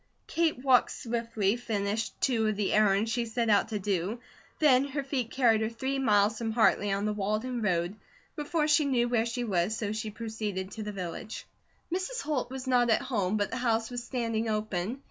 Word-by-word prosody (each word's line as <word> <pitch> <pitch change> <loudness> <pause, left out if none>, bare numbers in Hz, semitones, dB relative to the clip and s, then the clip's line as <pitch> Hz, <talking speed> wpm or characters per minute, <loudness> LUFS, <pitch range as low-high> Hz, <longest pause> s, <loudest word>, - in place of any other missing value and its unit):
Kate 330 -4 +1
walked 260 -2 +5
swiftly, 230 -3 -1
finished 220 -2 -2
two 225 -4 +2
of 215 - 0
the 205 -1 0
errands 210 +1 +3
she 240 +1 0
set 230 0 0
out 205 +2 +4
to 220 -1 -3
do, 200 +2 -1 0.4
then 270 -4 +5
her 280 0 -3
feet 265 -4 -2
carried 230 -4 +3
her 220 - 0
three 265 +4 -2
miles 215 -3 +3
from 230 -1 -2
Hartley 220 -3 +3
on 200 +1 0
the 210 - 0
Walden 215 +5 -2
road, 175 -2 0 0.4
before 300 0 0
she 300 0 +4
knew 245 -3 +2
where 235 -1 +1
she 240 +1 -2
was, 195 0 0
so 210 -3 -2
she 215 +1 -3
proceeded 210 -3 -4
to 220 - -6
the 210 0 -4
village. 185 +2 -6 0.5
Mrs. 380 +7 -2
Holt 275 -5 -2
was 265 0 -6
not 245 -2 +3
at 220 - +3
home, 205 -5 0
but 205 -1 -1
the 255 - -2
house 230 -2 0
was 245 -1 -4
standing 230 -3 -2
open. 215 +1 -2
225 Hz, 200 wpm, -29 LUFS, 210-250 Hz, 0.5 s, walked